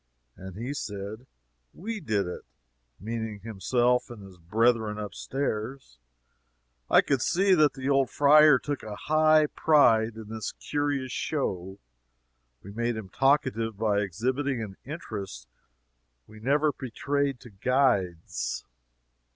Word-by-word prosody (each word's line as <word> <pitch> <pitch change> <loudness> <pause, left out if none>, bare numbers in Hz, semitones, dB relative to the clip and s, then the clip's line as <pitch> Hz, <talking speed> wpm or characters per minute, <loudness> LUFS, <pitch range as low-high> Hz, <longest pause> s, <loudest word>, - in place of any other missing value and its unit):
And 95 -1 -10
he 125 +6 -4
said, 110 -1 -6 0.5
"We 220 +4 -5
did 110 - 0
it" 90 - -6 0.6
meaning 110 -1 -5
himself 120 +4 0
and 115 -4 -10
his 95 -2 -14
brethren 110 +4 +1
up 105 -1 -5
stairs. 130 - -4 0.9
I - - +7
could 135 -3 0
see 190 +6 +3
that 155 -6 +4
the 135 -1 -5
old 135 -2 +3
friar 150 +1 +6
took 145 -1 -4
a 105 -1 -7
high 155 +3 +4
pride 115 -8 +3
in 110 -1 -9
his 110 -1 -5
curious 145 -3 -2
show. 95 - -3 0.9
We 100 - -10
made 120 +2 -1
him 105 -4 -7
talkative 130 -5 +1
by 105 -1 +1
exhibiting 125 +8 -1
an 100 -3 -8
interest 100 - -7 0.8
we 110 - -14
never 145 +6 +2
betrayed 140 +1 -2
to 120 - -13
guides. 95 - 0
115 Hz, 125 wpm, -27 LUFS, 105-140 Hz, 0.9 s, I